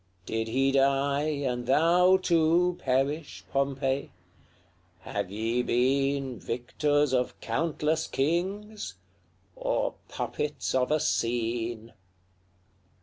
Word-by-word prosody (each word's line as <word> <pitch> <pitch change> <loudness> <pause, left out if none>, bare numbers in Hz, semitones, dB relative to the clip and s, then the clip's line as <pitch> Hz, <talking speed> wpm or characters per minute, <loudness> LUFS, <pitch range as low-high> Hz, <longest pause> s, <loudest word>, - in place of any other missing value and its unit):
did 110 +2 -2
he 135 +4 +2
die, 140 +2 +2 0.2
And 125 -1 -2
thou, 175 +6 +5
too, 175 0 +3
perish, 140 +4 -1
Pompey? 135 0 0 0.9
have - - -3
ye 115 +4 -1
been 135 +1 +1
Victors 145 +4 0
of 125 -1 0
countless 155 +5 -1
kings, 185 - -2 0.6
or - - -1 0.2
puppets 150 0 -3
of 130 -1 +2
a 155 +1 +2
scene? 115 -4 -1
135 Hz, 90 wpm, -28 LUFS, 125-155 Hz, 0.9 s, thou